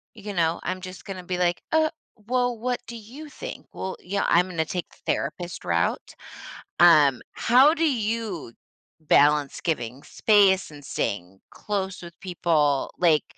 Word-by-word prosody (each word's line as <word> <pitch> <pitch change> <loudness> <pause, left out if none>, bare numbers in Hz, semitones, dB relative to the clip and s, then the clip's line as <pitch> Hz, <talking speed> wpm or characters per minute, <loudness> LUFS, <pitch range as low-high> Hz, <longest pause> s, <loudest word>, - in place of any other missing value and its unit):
you 210 -1 -7
know, 165 -1 +1
I'm 185 +1 -3
just 185 0 -9
gonna 190 -2 -7
be 180 0 -3
like, 175 -1 +1
"Uh, 315 0 +3 0.3
well, 245 +2 -1
what 245 +2 -2
do 235 - -7
you 255 +8 -10
think? - - -8
Well, 190 - -5
you 200 +2 -3
know, - - +1
I'm 180 +2 +3
gonna 160 -3 -1
take 180 0 -4
the - - -22
therapist 170 +5 -3
route." 85 0 -1 0.6
Um, 150 -7 +6
how 265 +6 +5
do 330 0 0
you 220 - -3 0.5
balance 150 -2 +3
giving 130 -5 -3
space 200 -4 +3
and 145 -1 -13
staying 95 -6 -4
close 195 -3 -4
with 170 -1 -11
people? 160 -6 +1
Like 165 -4 +3
180 Hz, 155 wpm, -25 LUFS, 155-215 Hz, 0.6 s, Um